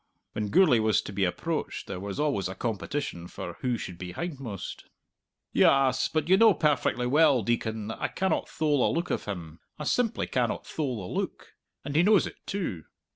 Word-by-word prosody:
When 105 Hz, -, -2 dB
Gourlay 160 Hz, -, +5 dB
was 110 Hz, -1 st, +3 dB
to 100 Hz, -, -7 dB
be 95 Hz, -1 st, +1 dB
approached 160 Hz, -, -3 dB
there 95 Hz, -2 st, -5 dB
was 100 Hz, 0 st, -5 dB
always 140 Hz, -11 st, +1 dB
a 95 Hz, -, -6 dB
competition 110 Hz, -4 st, -3 dB
for 85 Hz, -1 st, -7 dB
who 125 Hz, -2 st, 0 dB
should 90 Hz, -5 st, -7 dB
be 90 Hz, -1 st, -6 dB
hindmost. 135 Hz, -, -6 dB, 0.7 s
"Yass, 135 Hz, -2 st, +4 dB
but 155 Hz, -1 st, -1 dB
you 190 Hz, +2 st, +6 dB
know 220 Hz, -2 st, +6 dB
perfectly 145 Hz, -5 st, +1 dB
well, 140 Hz, -2 st, +4 dB
Deacon, 110 Hz, -1 st, -1 dB
that 110 Hz, -, -6 dB
I -, -, +1 dB
cannot 190 Hz, 0 st, -1 dB
thole 150 Hz, -3 st, +1 dB
the -, -, +2 dB
look 170 Hz, +1 st, -2 dB
of -, -, -2 dB
him. 85 Hz, -5 st, -6 dB, 0.2 s
I 150 Hz, -, -5 dB
simply 230 Hz, +9 st, +1 dB
cannot 125 Hz, -3 st, -1 dB
thole 125 Hz, -, -3 dB
the -, -, -2 dB
look. -, -, -8 dB, 0.3 s
And 145 Hz, 0 st, -4 dB
he 160 Hz, -, +6 dB
knows 205 Hz, +2 st, +5 dB
it -, -, -8 dB
too. 175 Hz, -, -3 dB
125 Hz, 190 wpm, -28 LUFS, 100-155 Hz, 0.7 s, you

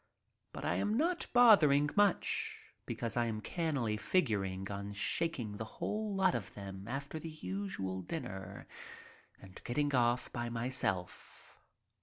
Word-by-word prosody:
But -, -, -6 dB
I -, -, +1 dB
am 210 Hz, +2 st, +1 dB
not 340 Hz, +5 st, +1 dB
bothering 155 Hz, -, +6 dB
much, 205 Hz, -3 st, +1 dB, 0.2 s
because 115 Hz, -2 st, -3 dB
I 120 Hz, -1 st, +2 dB
am 110 Hz, -1 st, -2 dB
cannily 135 Hz, -, -1 dB
figuring 100 Hz, -, 0 dB
on 100 Hz, 0 st, -5 dB
shaking 115 Hz, -1 st, -1 dB
the 110 Hz, -, -3 dB
whole 210 Hz, -1 st, -2 dB
lot 190 Hz, -1 st, +3 dB
of 110 Hz, -5 st, -4 dB
them 95 Hz, -1 st, -7 dB
after 140 Hz, +5 st, -4 dB
the 165 Hz, -, -6 dB
usual 155 Hz, -, -4 dB
dinner 95 Hz, -, -6 dB, 0.7 s
and 95 Hz, -1 st, -13 dB
getting 145 Hz, +3 st, 0 dB
off 120 Hz, -1 st, +2 dB
by 120 Hz, -1 st, -2 dB
myself. 115 Hz, -6 st, -3 dB
120 Hz, 135 wpm, -34 LUFS, 100-165 Hz, 0.7 s, bothering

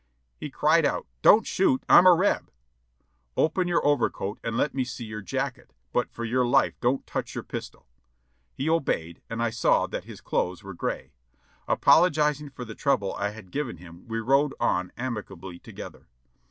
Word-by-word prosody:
He -, -, -7 dB
cried -, -, +3 dB
out, -, -, 0 dB, 0.2 s
"Don't 220 Hz, +2 st, +6 dB
shoot, 300 Hz, -9 st, +1 dB
I'm 180 Hz, -, +8 dB
a 180 Hz, -, +8 dB
Reb!" 190 Hz, +5 st, +1 dB, 0.9 s
"Open 175 Hz, +3 st, +2 dB
your 175 Hz, -4 st, +1 dB
overcoat 110 Hz, -7 st, 0 dB
and 115 Hz, 0 st, -2 dB
let 150 Hz, -, +1 dB
me 135 Hz, -, 0 dB
see 125 Hz, -1 st, -6 dB
your 110 Hz, 0 st, -6 dB
jacket; 85 Hz, -7 st, -4 dB, 0.2 s
but -, -, +1 dB
for 115 Hz, -, -5 dB
your 125 Hz, +2 st, +1 dB
life 120 Hz, -, +3 dB
don't 130 Hz, +2 st, 0 dB
touch -, -, -4 dB
your -, -, -4 dB
pistol." -, -, -8 dB, 0.6 s
He 135 Hz, -, -4 dB
obeyed, 110 Hz, -, -1 dB
and 115 Hz, +1 st, -2 dB
I 115 Hz, -, 0 dB
saw 115 Hz, -, +2 dB
that -, -, -6 dB
his -, -, -10 dB
clothes 90 Hz, +3 st, -2 dB
were 95 Hz, 0 st, -8 dB
gray. 85 Hz, -, -4 dB, 0.6 s
Apologizing 150 Hz, -3 st, +3 dB
for 125 Hz, -2 st, -8 dB
the 110 Hz, -, -8 dB
trouble 105 Hz, -6 st, 0 dB
I 100 Hz, 0 st, -2 dB
had 105 Hz, -3 st, -12 dB
given 135 Hz, -10 st, -3 dB
him 85 Hz, +1 st, -14 dB
we 115 Hz, 0 st, -3 dB
rode 135 Hz, +5 st, +2 dB
on 90 Hz, 0 st, 0 dB
amicably 95 Hz, -7 st, -6 dB
together. -, -, -11 dB
120 Hz, 175 wpm, -26 LUFS, 100-150 Hz, 0.9 s, I'm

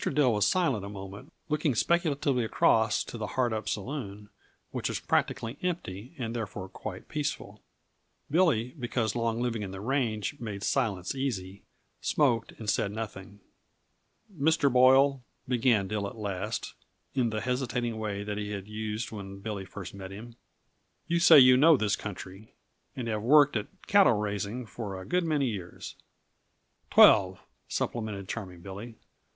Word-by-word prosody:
Dill 135 Hz, -4 st, +2 dB
was 105 Hz, -2 st, +2 dB
silent 150 Hz, -, +1 dB
a 100 Hz, -, -6 dB
minute, 100 Hz, +4 st, -9 dB, 0.2 s
looking 150 Hz, -3 st, 0 dB
speculatively 145 Hz, -4 st, +1 dB
across 110 Hz, -1 st, +3 dB
to 120 Hz, -, -8 dB
the 105 Hz, -, -3 dB
Hardup 115 Hz, -4 st, 0 dB
Saloon 105 Hz, -3 st, -5 dB, 0.4 s
which -, -, -2 dB
was -, -, -2 dB
practically 115 Hz, +5 st, -1 dB
empty 145 Hz, -, -4 dB
and 120 Hz, -3 st, -4 dB
therefore 105 Hz, -4 st, -5 dB
quite -, -, -8 dB
peaceful. 150 Hz, -2 st, -4 dB, 0.7 s
Billy, 150 Hz, -9 st, +3 dB
because 120 Hz, -3 st, -1 dB
long 115 Hz, -1 st, 0 dB
living 120 Hz, -3 st, -1 dB
on 100 Hz, -, -5 dB
the 95 Hz, 0 st, -7 dB
range 110 Hz, -3 st, -1 dB
made 105 Hz, -4 st, -5 dB
silence 105 Hz, -10 st, 0 dB
easy, 100 Hz, -8 st, -3 dB, 0.4 s
smoked 120 Hz, -7 st, +1 dB
and 110 Hz, -, -10 dB
said 100 Hz, 0 st, +1 dB
nothing. 105 Hz, -2 st, -7 dB, 0.9 s
"Mr. 150 Hz, -2 st, +2 dB
Boyle," 130 Hz, +2 st, +5 dB, 0.3 s
began 120 Hz, -5 st, +2 dB
Dill 105 Hz, 0 st, -2 dB
at 105 Hz, -, -9 dB
last, 100 Hz, -4 st, -4 dB, 0.4 s
in 125 Hz, -3 st, +1 dB
the 110 Hz, -1 st, -3 dB
hesitating 125 Hz, -2 st, -2 dB
way 100 Hz, -2 st, -3 dB
that 105 Hz, 0 st, -4 dB
he 105 Hz, 0 st, -4 dB
had 100 Hz, -1 st, -6 dB
used 110 Hz, +1 st, -4 dB
when 100 Hz, -2 st, -7 dB
Billy 100 Hz, -1 st, -5 dB
first 95 Hz, 0 st, -8 dB
met 95 Hz, -1 st, -8 dB
him, 115 Hz, +4 st, -10 dB, 0.7 s
"you 170 Hz, 0 st, +1 dB
say 170 Hz, -2 st, +8 dB
you 130 Hz, -2 st, +8 dB
know 155 Hz, +3 st, +7 dB
this 105 Hz, -4 st, +1 dB
country, 100 Hz, 0 st, -9 dB, 0.4 s
and 125 Hz, -3 st, -4 dB
have 110 Hz, -2 st, -1 dB
worked 145 Hz, +4 st, +5 dB
at 105 Hz, -2 st, -1 dB, 0.2 s
cattle 200 Hz, -9 st, +5 dB
raising 105 Hz, +3 st, -3 dB
for 100 Hz, -3 st, -6 dB
a 95 Hz, -, -9 dB
good 180 Hz, 0 st, +1 dB
many 150 Hz, -4 st, +1 dB
years 100 Hz, -8 st, -5 dB, 0.5 s
" -, -, -45 dB
"Twelve," 95 Hz, -1 st, +6 dB, 0.3 s
supplemented 105 Hz, -5 st, -3 dB
Charming 90 Hz, -6 st, -6 dB
Billy. 100 Hz, +5 st, -8 dB
110 Hz, 155 wpm, -29 LUFS, 100-130 Hz, 0.9 s, say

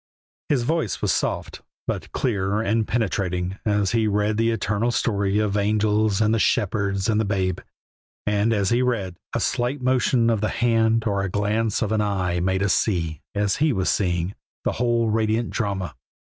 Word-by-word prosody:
His 135 Hz, -5 st, +2 dB
voice 155 Hz, -, -1 dB
was -, -, +2 dB
soft, -, -, -2 dB, 0.2 s
but -, -, -4 dB
clear 100 Hz, -4 st, 0 dB
and 110 Hz, 0 st, 0 dB
penetrating, 95 Hz, -4 st, -1 dB
as 105 Hz, -2 st, +2 dB
he 115 Hz, -2 st, +2 dB
read 105 Hz, +1 st, +1 dB
the 115 Hz, +1 st, +2 dB
eternal 115 Hz, 0 st, 0 dB
story 100 Hz, -4 st, 0 dB
of 105 Hz, -2 st, +1 dB
the 105 Hz, -, +1 dB
angels 105 Hz, 0 st, +1 dB
and 110 Hz, 0 st, +3 dB
the 115 Hz, -, +2 dB
shepherds 100 Hz, -1 st, +1 dB
and 110 Hz, -1 st, +2 dB
the -, -, +1 dB
Babe. 95 Hz, -3 st, -1 dB, 0.7 s
And 105 Hz, +2 st, +1 dB
as 100 Hz, -3 st, +1 dB
he 120 Hz, +1 st, +3 dB
read, 105 Hz, -8 st, -1 dB, 0.2 s
a -, -, +1 dB
slight 125 Hz, +4 st, -1 dB
motion 125 Hz, -2 st, +2 dB
of 110 Hz, -3 st, 0 dB
the 105 Hz, -, +1 dB
hand 115 Hz, -1 st, +2 dB
or 100 Hz, -3 st, 0 dB
a 100 Hz, -, -2 dB
glance 105 Hz, +3 st, 0 dB
of 105 Hz, -, -2 dB
an 110 Hz, -1 st, +2 dB
eye 95 Hz, -4 st, 0 dB
made 95 Hz, +2 st, 0 dB
us 100 Hz, -, +2 dB
see, 85 Hz, -7 st, 0 dB
as 100 Hz, -1 st, +1 dB
he 155 Hz, +1 st, +2 dB
was 95 Hz, -4 st, +1 dB
seeing, 90 Hz, -1 st, 0 dB, 0.3 s
that -, -, +2 dB
whole 120 Hz, -1 st, +1 dB
radiant 110 Hz, +1 st, 0 dB
drama. 100 Hz, -4 st, -2 dB
105 Hz, 185 wpm, -23 LUFS, 100-115 Hz, 0.7 s, and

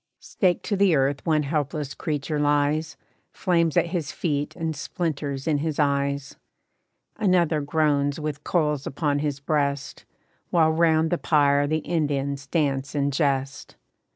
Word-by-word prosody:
Staked 180 Hz, -3 st, 0 dB
to 205 Hz, -, -1 dB
the 195 Hz, -4 st, +4 dB
earth 135 Hz, 0 st, +1 dB
one 155 Hz, -2 st, +3 dB
helpless 145 Hz, -1 st, -2 dB
creature 150 Hz, 0 st, -3 dB
lies, 145 Hz, +1 st, +1 dB, 0.4 s
Flames 170 Hz, -4 st, +1 dB
at -, -, +4 dB
his 165 Hz, -5 st, -2 dB
feet 145 Hz, -4 st, -2 dB
and 160 Hz, -2 st, -3 dB
splinters 145 Hz, -2 st, -3 dB
in 150 Hz, -2 st, +2 dB
his 155 Hz, 0 st, -2 dB
eyes. 140 Hz, -1 st, 0 dB, 0.8 s
Another 175 Hz, -6 st, +2 dB
groans 145 Hz, -1 st, +1 dB
with 150 Hz, -1 st, -4 dB
coals 150 Hz, -5 st, 0 dB
upon 145 Hz, 0 st, -1 dB
his 145 Hz, -2 st, -2 dB
breast, 140 Hz, -1 st, -2 dB, 0.4 s
While 160 Hz, -2 st, +3 dB
'round 160 Hz, 0 st, +2 dB
the 175 Hz, -, +1 dB
pyre 145 Hz, -2 st, +3 dB
the 155 Hz, +1 st, -1 dB
Indians 140 Hz, -4 st, -1 dB
dance 140 Hz, -3 st, -1 dB
and 140 Hz, -1 st, 0 dB
jest. 135 Hz, -2 st, -1 dB
150 Hz, 140 wpm, -24 LUFS, 140-160 Hz, 0.8 s, the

